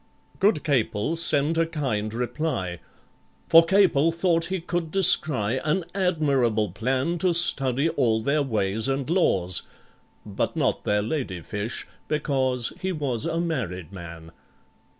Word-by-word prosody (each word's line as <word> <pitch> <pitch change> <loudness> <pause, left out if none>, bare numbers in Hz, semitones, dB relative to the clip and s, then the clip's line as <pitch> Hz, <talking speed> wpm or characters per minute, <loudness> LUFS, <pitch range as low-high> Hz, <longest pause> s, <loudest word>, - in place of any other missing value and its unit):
Good 195 -6 +2
CAPEL 130 -1 0
sent 160 -1 0
a 165 - +2
kind 125 -10 -2
reply, 120 - -3 0.7
For 165 0 +8
CAPEL 165 -4 +3
thought 165 0 +1
he 190 +1 -3
could 170 -1 -3
descry 130 - +3
An 165 +3 0
admirable 140 - +1
plan 130 - -1
To 180 -1 +1
study 140 -4 +3
all 115 -8 +1
their 145 +4 +1
ways 110 -3 -1
and 135 -1 -2
laws— 95 - +1 0.6
(But - - -3
not - - -1
their 105 0 +1
lady 110 - -3
fish, 105 +7 -4 0.2
because 130 -5 0
He 190 - -1
was 140 -9 -2
a 165 - -1
married 110 - -3
man). 85 -3 -10
140 Hz, 130 wpm, -24 LUFS, 110-165 Hz, 0.7 s, For